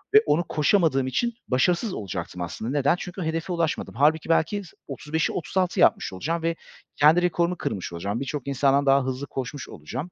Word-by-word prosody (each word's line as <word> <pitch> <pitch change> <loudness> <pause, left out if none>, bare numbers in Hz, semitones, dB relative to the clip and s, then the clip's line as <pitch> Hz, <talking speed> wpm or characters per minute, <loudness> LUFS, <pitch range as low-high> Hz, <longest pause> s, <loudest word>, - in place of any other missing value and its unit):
Ve 215 - +10
onu 150 +4 +2
koşamadığım 150 -4 +2
için 235 - 0
başarısız 175 - +1
olacaktım 95 -2 -5
aslında. 110 +7 -4
Neden? 145 +2 +2
Çünkü 180 +1 -6
hedefe 165 +3 -2
ulaşmadım. 165 -7 -2
Halbuki 155 +5 +2
belki 165 +5 +2 0.3
35'i, 155 +1 -2
36'yı, 185 +1 -1
yapmış 110 - +3
olacağım 160 - -3
ve 165 0 0 0.4
kendi 155 +4 +6
rekorumu 175 0 +1
kırmış 90 - -4
olacağım. 100 +6 -3
Birçok 140 0 -4
insandan 140 +1 +2
daha 135 0 +4
hızlı 130 +2 -4
koşmuş 135 +2 -5
olacağım 130 - -6
150 Hz, 165 wpm, -25 LUFS, 130-170 Hz, 0.4 s, Ve